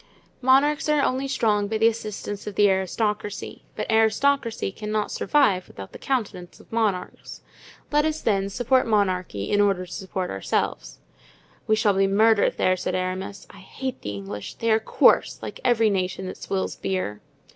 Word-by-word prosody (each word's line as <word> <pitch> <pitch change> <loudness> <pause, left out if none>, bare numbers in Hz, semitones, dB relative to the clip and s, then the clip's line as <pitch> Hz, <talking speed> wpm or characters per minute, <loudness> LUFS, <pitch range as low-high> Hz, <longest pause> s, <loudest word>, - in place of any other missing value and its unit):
Monarchs 280 +4 +3
are 300 -2 +3
only 265 +2 0
strong 210 -6 +1
by 220 +1 -1
the 220 - +2
assistance 215 -2 -2
of 205 - -5
the 205 - +5
aristocracy, 205 +2 -2
but - - -3
aristocracy 225 +1 +2
cannot 210 +1 -3
survive 210 -12 +2
without 95 -1 -10
the - - -11
countenance 205 -9 -3
of - - -19
monarchs. 215 -5 -2 0.5
Let 295 0 +3
us, 315 0 -1
then, 195 -6 0
support 245 +4 +1
monarchy, 185 - 0
in 205 0 +4
order 195 -3 +1
to 175 - -15
support 190 -1 -4
ourselves. - - -2 0.7
"We 215 - +4
shall 215 -2 +2
be 195 0 +2
murdered 215 +2 +3
there," 185 - +3
said - - -2
Aramis. 185 +2 -4
"I 200 - -14
hate 260 +7 -6
the 105 - -5
English—they 105 - -4
are 220 - +4
coarse, 220 - +3
like - - -7
every 230 -3 +3
nation 190 -1 -2
that 185 - -6
swills 190 -1 -3
beer." 185 - -3
205 Hz, 165 wpm, -24 LUFS, 185-230 Hz, 0.7 s, the